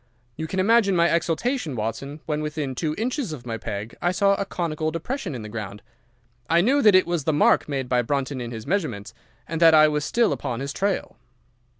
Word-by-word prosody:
You 160 +1 -4
can 190 - -3
imagine 200 0 +4
my 170 0 +4
exultation, 170 - -1
Watson, 120 +7 -4
when 150 -1 -2
within 150 -3 -3
two 155 +4 -2
inches 245 - -2
of 130 -5 -9
my 115 -2 -4
peg 105 0 -5
I 175 - +2
saw 200 +2 +3
a 200 - -1
conical 160 -4 -2
depression 170 - -4
in 115 - -6
the - - -7
ground. 105 -2 -7 0.7
I 170 - +4
knew 270 +9 +3
that 210 -6 +6
it 185 - +5
was 170 -4 -2
the 160 - +2
mark 150 - +3
made 135 -3 -2
by 125 -1 +2
Brunton 135 +1 -2
in 120 - -5
his 115 -2 -7
measurements, 120 - -2 0.3
and 165 0 -4
that 165 -1 +7
I 155 0 +7
was 150 -1 -1
still 230 +3 +2
upon 120 -2 -4
his 140 +1 -4
trail. 195 - -2
155 Hz, 215 wpm, -24 LUFS, 125-185 Hz, 0.7 s, that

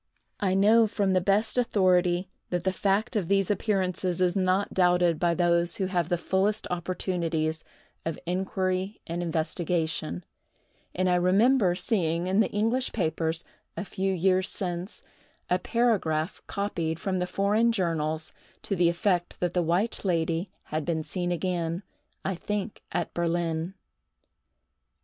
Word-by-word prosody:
I 190 -2 +1
know 220 +3 +5
from 200 -2 0
the 185 - +3
best 210 +6 +2
authority 185 -5 +2 0.2
that 175 -1 -1
the 190 - +2
fact 200 +6 0
of 195 -6 0
these 195 +1 +2
appearances 185 -4 0
is 180 -1 +2
not 190 +1 +1
doubted 180 -3 +3
by 170 -1 +2
those 170 0 +2
who 195 - -1
have 180 -3 -1
the 175 - +2
fullest 190 +4 0
opportunities 170 -3 -1 0.4
of 165 -1 -3
inquiry 185 +2 -1
and 170 +1 -3
investigation; 160 - -1 0.7
and 185 +1 +1
I 180 - +3
remember 190 +3 +4
seeing 175 -4 +1
in 190 +3 +1
the 220 - +3
English 225 +5 0
papers, 160 -3 -1 0.3
a 210 - -3
few 190 0 -1
years 185 +1 +2
since, 180 0 -3 0.5
a 180 - +3
paragraph 185 -8 0
copied 170 -6 -2
from 190 -2 -1
the 180 - -1
foreign 205 +5 +2
journals, 160 -6 -1 0.3
to 200 - -2
the 175 -2 +4
effect 175 0 0
that 175 -1 -1
the 180 - +2
White 175 +7 0
Lady 170 -1 0 0.2
had 155 0 -3
been 160 0 -1
seen 175 +2 -3
again, 175 0 -1 0.4
I 195 - 0
think 210 +3 -4
at - - -2
Berlin. 170 +1 -1
180 Hz, 145 wpm, -27 LUFS, 170-195 Hz, 0.7 s, know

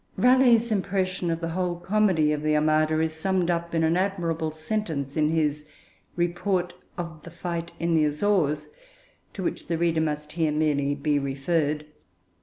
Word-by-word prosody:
Raleigh's 245 -2 +5
impression 190 -3 -1
of 165 0 -1
the 165 - -2
whole 180 +1 -1
comedy 180 -4 +2
of 150 -1 -1
the 155 0 +1
Armada 155 +1 +2
is 160 0 0
summed 180 +2 0
up 170 0 -2
in 165 - +2
an 160 +1 +3
admirable 175 -4 -1
sentence 155 -4 -3
in 155 -1 +2
his 150 -2 0 0.5
Report 175 +1 0 0.2
of 170 -3 -6
the 170 - -10
Fight 170 0 -5
in 170 0 0
the 155 -2 +4
Azores, 150 -1 +1 0.7
to 190 - -4
which - - -3
the 165 - -1
reader 165 -1 +1
must 150 -1 -2
here 160 -2 0
merely 145 -2 +1
be 145 0 +1
referred. 145 +2 -1
165 Hz, 165 wpm, -26 LUFS, 150-180 Hz, 0.7 s, Raleigh's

